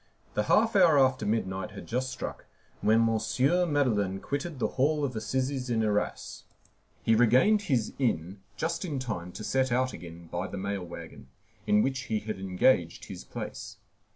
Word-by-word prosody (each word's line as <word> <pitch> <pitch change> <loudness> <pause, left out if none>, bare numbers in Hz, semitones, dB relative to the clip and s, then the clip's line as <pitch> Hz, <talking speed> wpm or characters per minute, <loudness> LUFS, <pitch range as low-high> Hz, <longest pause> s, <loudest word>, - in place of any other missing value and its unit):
The 105 - 0
half 225 0 +4
hour 175 -6 +6
after 130 -5 +3
midnight 95 -2 -1
had - - -9
just 130 +2 -2
struck - - -6 0.3
when 115 +1 +4
M. 115 -1 +1 0.5
Madeleine 105 -10 +1
quitted 145 - -4
the - - 0
Hall 145 +3 +1
of 130 -3 -4
Assizes 130 +3 -2
in 115 -2 +1
Arras. 105 -1 -2 0.6
He 115 - +3
regained 125 - +5
his 120 -6 +1
inn 95 - -1 0.2
just 165 +3 -2
in 155 -6 -3
time 105 -9 -4
to 110 - -7
set 130 +2 +1
out 130 +1 +1
again 85 0 -10
by 90 +2 -2
the 100 - -6
mail 100 0 -3
wagon, 85 - -10 0.4
in 105 0 +4
which 135 0 -1
he 110 -1 +1
had 105 -2 -5
engaged 90 -1 +2
his - - -8
place. - - -7
115 Hz, 170 wpm, -29 LUFS, 100-135 Hz, 0.6 s, hour